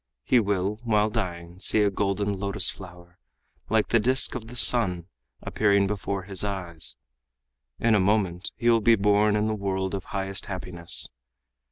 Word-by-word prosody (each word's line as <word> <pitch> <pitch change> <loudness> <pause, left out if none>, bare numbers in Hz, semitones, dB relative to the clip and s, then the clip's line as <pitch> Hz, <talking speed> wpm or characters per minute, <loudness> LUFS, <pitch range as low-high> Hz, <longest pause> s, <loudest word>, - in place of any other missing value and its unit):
He 125 - +3
will, 100 0 -1
while 105 -2 +1
dying, 90 -5 -5
see 105 +2 +2
a 100 - +2
golden 100 0 -1
lotus 100 +1 -1
flower, 90 -1 -13 0.5
like 110 -1 +1
the 115 - +3
disk 130 +5 +4
of 110 - -6
the 125 - -10
sun, 95 -9 +2 0.4
appearing 100 -2 +2
before 100 -1 -3
his 95 0 -3
eyes; 90 -5 -1 0.8
in 115 -1 +2
a 105 - +4
moment 95 -2 0
he 120 +2 -3
will 115 -1 +4
be 115 +2 +5
born 105 +1 +2
in 105 0 +1
the 110 - -1
world 95 -2 -3
of 95 -2 -4
highest 95 0 -3
happiness. 90 -3 -1
100 Hz, 165 wpm, -25 LUFS, 95-110 Hz, 0.8 s, be